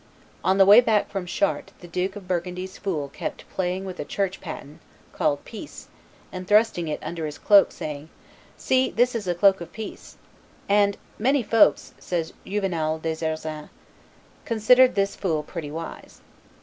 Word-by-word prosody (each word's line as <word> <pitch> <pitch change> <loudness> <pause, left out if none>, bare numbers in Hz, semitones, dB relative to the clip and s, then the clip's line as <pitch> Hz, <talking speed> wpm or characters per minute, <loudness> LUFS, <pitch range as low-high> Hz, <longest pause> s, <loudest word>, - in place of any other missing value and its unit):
On 190 - +3
the 195 - +7
way 205 +5 +9
back 220 -4 +1
from 195 -3 -4
Chartres 200 +2 -1
the 175 - -11
Duke 185 +3 -2
of 200 -3 -10
Burgundy's 180 +1 -3
fool 155 -8 -2
kept - - -6
playing 185 +1 -2
with 185 -1 -7
a - - -2
church 195 -2 -2
paten 155 -3 -8 0.3
(called 145 -2 0
"peace"), 230 +6 -10 0.4
and 185 -1 -7
thrusting 210 -5 +3
it 150 - -2
under 165 -2 -4
his 150 - -7
cloak, 200 -1 +5
saying, 150 0 -7 0.5
"See, 260 0 +2
this 245 +2 +2
is 220 -5 -4
a 175 - 0
cloak 195 +1 +4
of 170 - -8
peace;" 220 -1 -9 0.5
and, 200 0 +3 0.2
"Many 265 +4 +2
folks," 225 0 +3
says 165 -3 -3
Juvenal 170 -6 -1
des 160 0 -4
Ursins, 155 -1 -4 0.7
"considered 250 +3 +4
this 200 0 0
fool 160 -6 -1
pretty 155 -1 -6
wise." 165 +2 -8
185 Hz, 160 wpm, -24 LUFS, 165-205 Hz, 0.7 s, way